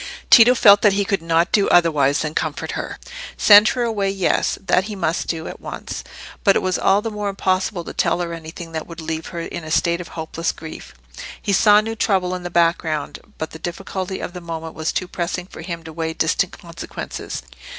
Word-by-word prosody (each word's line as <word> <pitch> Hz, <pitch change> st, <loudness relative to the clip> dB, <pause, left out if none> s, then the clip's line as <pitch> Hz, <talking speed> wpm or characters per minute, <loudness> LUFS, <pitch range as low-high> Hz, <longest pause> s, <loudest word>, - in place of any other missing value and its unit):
Tito 245 Hz, +1 st, +8 dB
felt 205 Hz, -3 st, +7 dB
that 205 Hz, -2 st, +5 dB
he 200 Hz, 0 st, +1 dB
could 195 Hz, -2 st, 0 dB
not 165 Hz, +1 st, +1 dB
do 200 Hz, -2 st, +3 dB
otherwise 150 Hz, -5 st, +3 dB
than 150 Hz, -1 st, -3 dB
comfort -, -, -2 dB
her. -, -, -5 dB, 0.4 s
Send 210 Hz, 0 st, +8 dB
her 245 Hz, -, 0 dB
away—yes; 195 Hz, -4 st, 0 dB
that 185 Hz, 0 st, +2 dB
he 215 Hz, -1 st, -6 dB
must 170 Hz, -3 st, -1 dB
do, 160 Hz, -1 st, -3 dB
at -, -, -9 dB
once. -, -, -6 dB, 0.4 s
But 195 Hz, -, +5 dB
it -, -, +1 dB
was 185 Hz, -1 st, 0 dB
all 200 Hz, +2 st, +3 dB
the 225 Hz, -, -3 dB
more 210 Hz, -1 st, -3 dB
impossible 185 Hz, -1 st, -1 dB
to -, -, -8 dB
tell -, -, +1 dB
her 170 Hz, -1 st, -3 dB
anything 165 Hz, +1 st, -8 dB
that 160 Hz, -1 st, -5 dB
would 170 Hz, -1 st, -9 dB
leave 160 Hz, 0 st, -4 dB
her 170 Hz, -2 st, -5 dB
in 170 Hz, -, -6 dB
a 155 Hz, -, -8 dB
state 170 Hz, +2 st, +1 dB
of 175 Hz, -, -9 dB
hopeless 165 Hz, +1 st, -3 dB
grief. 160 Hz, -, -10 dB, 0.4 s
He 200 Hz, -, -1 dB
saw 210 Hz, +2 st, +6 dB
new 225 Hz, +1 st, -4 dB
trouble 190 Hz, -5 st, +1 dB
in 180 Hz, -, -4 dB
the 175 Hz, -, -5 dB
background, 165 Hz, -3 st, 0 dB, 0.2 s
but 160 Hz, -, -4 dB
the 160 Hz, -, -10 dB
difficulty 190 Hz, +2 st, -5 dB
of 175 Hz, -, -5 dB
the 180 Hz, -, -7 dB
moment 165 Hz, -1 st, -6 dB
was 160 Hz, 0 st, -2 dB
too 185 Hz, -, -2 dB
pressing 175 Hz, 0 st, -3 dB
for 185 Hz, -, -11 dB
him 170 Hz, -1 st, -6 dB
to 160 Hz, 0 st, -10 dB
weigh 160 Hz, 0 st, -3 dB
distant -, -, 0 dB
consequences. -, -, -7 dB
175 Hz, 210 wpm, -21 LUFS, 165-195 Hz, 0.4 s, Tito